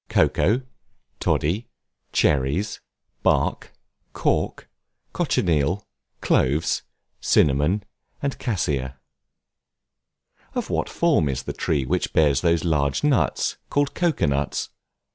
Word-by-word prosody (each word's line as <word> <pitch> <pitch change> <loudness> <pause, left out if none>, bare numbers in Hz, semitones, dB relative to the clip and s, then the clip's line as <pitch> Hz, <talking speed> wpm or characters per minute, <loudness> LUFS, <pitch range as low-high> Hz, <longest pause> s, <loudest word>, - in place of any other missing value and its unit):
COCOA, 120 +8 +2 0.6
TODDY, 95 +10 0 0.4
CHERRIES, 75 +9 +1 0.4
BARK, - - +1 0.4
CORK, - - -1 0.5
COCHINEAL, 85 +4 +1 0.4
CLOVES, 75 +6 +2 0.4
CINNAMON, 75 +8 +3 0.4
AND 140 -1 -3
CASSIA. 70 - -1 1.6
Of - - -2
what - - 0
form 75 - +2
is 65 -1 -2
the - - -4
tree 70 -4 0
which - - -1
bears 75 -3 +3
those 85 -1 +2
large 70 - +1
nuts, 145 -4 +1
called 145 0 +1
Cocoa 170 -4 +1
nuts? 70 0 -1
80 Hz, 95 wpm, -23 LUFS, 70-105 Hz, 1.6 s, CINNAMON